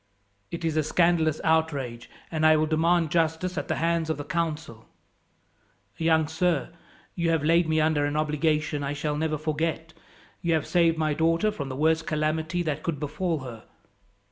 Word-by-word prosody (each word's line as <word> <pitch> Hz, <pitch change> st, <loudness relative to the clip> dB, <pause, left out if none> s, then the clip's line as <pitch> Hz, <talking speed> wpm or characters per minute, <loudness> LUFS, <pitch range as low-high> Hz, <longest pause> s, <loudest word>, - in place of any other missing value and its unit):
"It 170 Hz, 0 st, -5 dB
is 160 Hz, -1 st, 0 dB
a -, -, +4 dB
scandalous 160 Hz, -1 st, +2 dB
outrage, 145 Hz, -7 st, 0 dB, 0.2 s
and 160 Hz, -1 st, -1 dB
I 155 Hz, 0 st, +6 dB
will 155 Hz, -, +2 dB
demand 165 Hz, +1 st, +2 dB
justice 165 Hz, +2 st, 0 dB
at -, -, -3 dB
the -, -, 0 dB
hands 165 Hz, -1 st, 0 dB
of 160 Hz, -, -1 dB
the 145 Hz, -, -5 dB
council. 150 Hz, -7 st, -3 dB, 1.1 s
"Young 160 Hz, -1 st, +2 dB
sir, 160 Hz, -1 st, 0 dB, 0.4 s
you 170 Hz, -2 st, -1 dB
have 165 Hz, -3 st, +1 dB
laid 165 Hz, +1 st, +3 dB
me 160 Hz, 0 st, +2 dB
under 155 Hz, -2 st, +2 dB
an 145 Hz, +1 st, -2 dB
obligation 150 Hz, -1 st, 0 dB
I 140 Hz, +1 st, -2 dB
shall 150 Hz, +1 st, -2 dB
never 155 Hz, 0 st, -1 dB
forget. 160 Hz, +1 st, -2 dB, 0.5 s
You 170 Hz, -1 st, +1 dB
have 155 Hz, -, -1 dB
saved 165 Hz, -2 st, +2 dB
my 155 Hz, -1 st, +1 dB
daughter 165 Hz, +7 st, +2 dB
from 140 Hz, -9 st, -5 dB
the 130 Hz, -, -5 dB
worst 160 Hz, +3 st, +1 dB
calamity 155 Hz, +3 st, -1 dB
that 155 Hz, -2 st, -2 dB
could 160 Hz, -4 st, -3 dB
befall 160 Hz, +1 st, -2 dB
her. 120 Hz, -4 st, -9 dB
160 Hz, 175 wpm, -26 LUFS, 150-165 Hz, 1.1 s, I